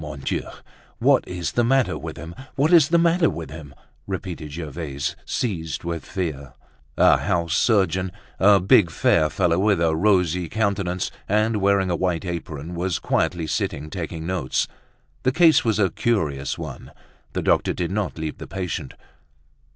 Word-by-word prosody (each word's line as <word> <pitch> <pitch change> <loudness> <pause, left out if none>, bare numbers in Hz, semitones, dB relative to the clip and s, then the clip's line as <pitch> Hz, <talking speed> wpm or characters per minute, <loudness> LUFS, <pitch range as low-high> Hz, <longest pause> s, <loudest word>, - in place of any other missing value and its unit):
"Mon 75 -3 -7
Dieu! - - -1 0.6
what - - +4
is 90 -2 -3
the 120 - +1
matter 130 +1 +2
with - - -7
him? 85 +1 -8 0.2
What 145 +5 +2
is 160 -3 +7
the 170 - +4
matter 170 0 +3
with 80 - -6
him?" 75 -3 -10 0.3
repeated 90 -5 -5
Gervaise, 75 -3 -4
seized 85 -10 -2
with 85 -1 -4
fear. 70 -8 -4 0.4
A - - +6
house 85 -2 0
surgeon, 95 -4 +2 0.3
a 100 0 +6
big 90 0 +5
fair 80 -1 +2
fellow 85 +2 +1
with 100 -2 +3
a 80 -1 +2
rosy 90 -2 +2
countenance, 100 -4 -1 0.2
and 110 +2 +2
wearing 100 -1 +2
a - - +1
white 90 0 -1
apron, 85 -2 -5
was 90 0 -1
quietly 85 -2 0
sitting 75 0 -3
taking 80 -2 -5
notes. 90 -1 -1 0.5
The 130 - +2
case 160 0 +5
was 110 -3 +1
a 100 -4 +2
curious 75 -12 -1
one; - - -8 0.4
the - - -2
doctor - - +2
did 85 0 -3
not 100 -3 -2
leave 80 -1 -5
the - - -8
patient. 90 -6 -4
90 Hz, 160 wpm, -23 LUFS, 80-100 Hz, 0.6 s, is